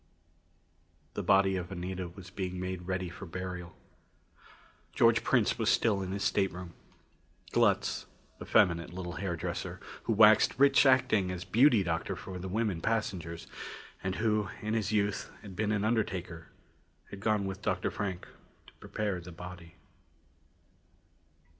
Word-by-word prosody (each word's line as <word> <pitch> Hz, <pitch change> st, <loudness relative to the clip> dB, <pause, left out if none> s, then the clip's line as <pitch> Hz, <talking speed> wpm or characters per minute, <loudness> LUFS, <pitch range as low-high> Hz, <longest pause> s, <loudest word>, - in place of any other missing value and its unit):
The -, -, -3 dB
body 95 Hz, 0 st, +4 dB
of 90 Hz, 0 st, -5 dB
Anita 90 Hz, 0 st, -4 dB
was 90 Hz, 0 st, -12 dB
being 90 Hz, -2 st, -4 dB
made 90 Hz, -1 st, -4 dB
ready 95 Hz, -1 st, -1 dB
for 90 Hz, +3 st, -9 dB
burial. 90 Hz, 0 st, -6 dB, 1.2 s
George -, -, +4 dB
Prince -, -, +2 dB
was -, -, +2 dB
still 105 Hz, -4 st, +3 dB
in 95 Hz, -1 st, -4 dB
his 100 Hz, +1 st, -2 dB
stateroom. 90 Hz, -3 st, 0 dB, 0.8 s
Glutz, -, -, +2 dB, 0.3 s
effeminate 85 Hz, -2 st, +3 dB
little 90 Hz, -1 st, -6 dB
hairdresser, 90 Hz, -4 st, -3 dB, 0.3 s
who 115 Hz, -, +2 dB
waxed 105 Hz, 0 st, +6 dB
rich 140 Hz, +1 st, +6 dB
acting 130 Hz, -8 st, +4 dB
as 90 Hz, -1 st, -4 dB
beauty 120 Hz, -3 st, +5 dB
doctor 85 Hz, -2 st, -2 dB
for 90 Hz, -1 st, -7 dB
the 95 Hz, +1 st, -5 dB
women 105 Hz, -4 st, -1 dB
passengers, 90 Hz, -7 st, -2 dB, 0.6 s
and 95 Hz, 0 st, -1 dB
who, 105 Hz, -2 st, +1 dB
in 110 Hz, +1 st, -1 dB
his 110 Hz, -2 st, 0 dB
youth, 100 Hz, -2 st, 0 dB
had 95 Hz, -3 st, -9 dB
been 105 Hz, +2 st, 0 dB
an 105 Hz, -1 st, +1 dB
undertaker, 90 Hz, -7 st, -1 dB, 0.6 s
had 100 Hz, -, -7 dB
gone 105 Hz, -1 st, +1 dB
with 95 Hz, 0 st, -5 dB
Dr. -, -, -1 dB
Frank 95 Hz, -3 st, -4 dB, 0.4 s
to -, -, -18 dB
prepare 100 Hz, -4 st, -3 dB
the 90 Hz, +1 st, -10 dB
body. 90 Hz, -1 st, -10 dB
95 Hz, 140 wpm, -31 LUFS, 90-105 Hz, 1.2 s, waxed